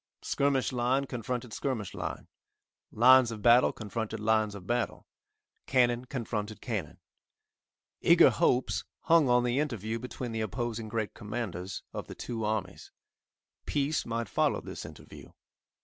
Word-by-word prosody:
Skirmish 140 -2 +1
line 130 +2 +1
confronted 125 -2 -4
skirmish 125 -8 -3
line, - - -5 0.6
lines 125 +2 +6
of 110 -2 -7
battle 120 +1 +6
confronted 110 +1 -5
lines 110 -1 +1
of 95 -3 -9
battle, 120 +2 -2 0.6
cannon 125 -1 +2
confronted 110 -4 -4
cannon. 105 -10 -4 1.0
Eager - - +7
hopes 105 -6 +1 0.2
hung 165 -5 +4
on 125 0 +4
the 125 +2 +1
interview 115 -6 -2
between 125 0 -6
the 115 0 -2
opposing 110 0 -3
great 110 -1 -2
commanders 105 -4 -5
of - - -5
the - - -8
two 115 -2 -4
armies. 105 -3 -3 0.8
Peace 145 +1 0
might 115 -1 -3
follow - - +1
this - - -8
interview. - - -13
115 Hz, 135 wpm, -30 LUFS, 110-125 Hz, 1.0 s, Eager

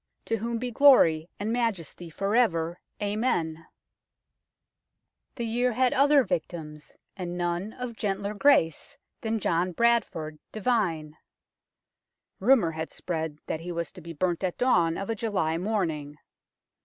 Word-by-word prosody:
To 225 - 0
whom 230 +2 -2
be 245 +1 -3
glory 185 - +5
and 215 +3 -1
majesty 190 - -2
for 195 +6 -1
ever. 170 -8 +2 0.2
Amen! 200 -7 -1 0.8
" - - -57
The 235 - -3
year 245 +2 +1
had 255 +2 +2
other 280 +1 +5
victims, 155 -5 -5 0.2
and 175 -2 -5
none 175 +4 -2
of 250 -2 -6
gentler 200 -1 -2
grace 280 - +2 0.2
than 225 -2 -1
John 175 -1 0
Bradford, 170 -9 +1
divine. 190 -10 -1 1.2
Rumour 220 -5 +4
had 160 0 -5
spread 160 -3 -4
that 160 - -3
he 175 +1 -5
was 170 -1 -3
to 185 - -12
be 170 +1 -8
burnt 175 +3 -1
at 180 -2 -1
dawn 175 -10 +3
of 195 - -4
a - - -1
July 185 -8 -1
morning. 165 -8 -2
190 Hz, 140 wpm, -27 LUFS, 165-230 Hz, 1.2 s, glory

